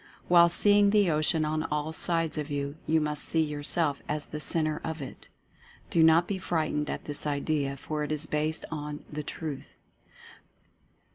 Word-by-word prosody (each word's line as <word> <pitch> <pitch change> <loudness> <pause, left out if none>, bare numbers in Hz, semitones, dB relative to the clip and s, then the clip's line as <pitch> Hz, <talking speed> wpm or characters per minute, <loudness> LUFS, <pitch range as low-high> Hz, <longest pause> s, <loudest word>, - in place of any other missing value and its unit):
While 170 -1 +6
seeing 205 +3 +4
the 205 -4 +3
Ocean 155 +1 +1
on 155 +1 -1
all 150 0 -3
sides 165 -2 +1
of 150 0 -5
you, 140 0 -3
you 160 0 +3
must 150 -1 0
see 160 - +2
yourself 150 0 0
as 150 0 -2
the 150 - -7
Centre 155 0 +2
of 160 0 -4
it. 135 -3 -9 0.6
Do 165 - +3
not 160 +2 +5
be 195 -2 -3
frightened 155 -4 -2
at - - -5
this 145 0 +1
idea, 140 -1 -1
for 150 +2 -4
it 150 - -4
is 155 0 -2
based 155 +1 -1
on 150 -1 -6
the 150 - -3
Truth. 150 -1 -7
155 Hz, 170 wpm, -28 LUFS, 150-160 Hz, 0.6 s, While